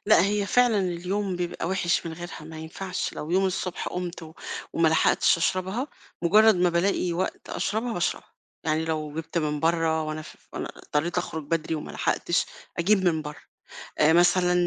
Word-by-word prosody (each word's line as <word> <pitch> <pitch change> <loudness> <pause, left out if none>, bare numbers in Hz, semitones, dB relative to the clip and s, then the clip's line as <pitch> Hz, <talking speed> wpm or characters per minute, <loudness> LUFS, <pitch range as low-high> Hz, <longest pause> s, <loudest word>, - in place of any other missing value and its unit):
لأ 170 - +6
هي 205 0 0
فعلًا 245 -1 +4
اليوم 185 +1 -1
بيبقى 175 -1 -3
وحِش 180 -3 +1
من 165 - -4
غيرها 175 +1 -7
ما 160 0 -9
ينفعش، 180 +4 -4
لو 150 - -5
يوم 190 +2 +3
الصُّبح 185 -1 -2
قُمت 180 -1 -5
و 160 0 -10 0.4
وما 165 -1 +3
لَحقتش 160 +1 +4
أشربها، 190 - 0 0.4
مُجرّد 215 +5 +6
ما 180 0 +3
بالاقي 175 0 +1
وقت 180 +2 -3
أشربها 225 +3 -1
باشربها، 175 -5 -2 0.3
يعني 160 0 +1
لو 155 -2 -3
جِبت 165 +1 -3
من 150 -2 -1
برّه 165 -1 +2
وأنا 155 0 -4
ف - - -12 0.2
وأنا - - -4
اضطريت 165 +4 -1
أخرُج 160 -3 -4
بَدري 160 +1 -1
وما 150 - -5
لَحقتش 175 - 0 0.3
أجيب 190 +3 +3
من 160 -3 +2
برّه، 150 -1 -8 0.6
آآ 155 +1 +6
مثلًا 180 +1 +4
175 Hz, 170 wpm, -26 LUFS, 160-185 Hz, 0.6 s, لأ